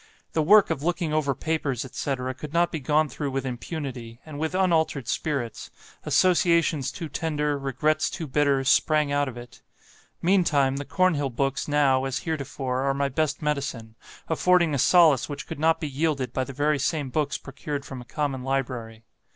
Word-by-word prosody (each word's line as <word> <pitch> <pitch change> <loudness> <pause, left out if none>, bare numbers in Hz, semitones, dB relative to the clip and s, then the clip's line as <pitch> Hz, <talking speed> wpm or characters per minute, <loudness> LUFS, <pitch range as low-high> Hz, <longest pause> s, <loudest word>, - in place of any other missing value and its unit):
The 160 - +2
work 200 +4 +6
of 150 -4 -2
looking 170 -1 -1
over 145 -3 +1
papers, 140 -4 -2
etc., 130 0 -3
could 145 +4 -9
not 170 0 +2
be 160 - -3
gone 150 +3 +2
through 145 +2 -4
with 135 0 -3
impunity, 125 -2 -6
and 150 -2 -8
with 160 +3 -2
unaltered 160 - +1
spirits; 130 -4 -3 0.4
associations 170 -6 +3
too 165 - -6
tender, 150 -1 -1
regrets 150 +3 0
too 165 - -5
bitter, 140 -1 +2
sprang 150 +1 +3
out 145 0 +1
of 125 -2 -7
it. 120 -1 -12 0.6
Meantime, 155 -7 +2
the 145 - -4
Cornhill 160 -6 +1
books 135 +2 -1
now, 140 -3 +3
as 135 -2 -2
heretofore, 135 -4 -2
are 135 0 0
my 140 0 0
best 150 +2 -1
medicine, 140 -7 -3 0.3
affording 170 0 +3
a 140 - 0
solace 155 -1 +5
which 145 - -6
could - - -7
not 160 +1 +3
be 155 - -3
yielded 140 -3 -1
by 130 - -1
the 140 - -7
very 145 +2 +1
same 135 0 -1
books 145 0 0
procured 140 +1 -6
from 130 -2 -7
a - - -12
common 135 -1 -3
library. 125 -4 -3
145 Hz, 175 wpm, -25 LUFS, 135-155 Hz, 0.6 s, work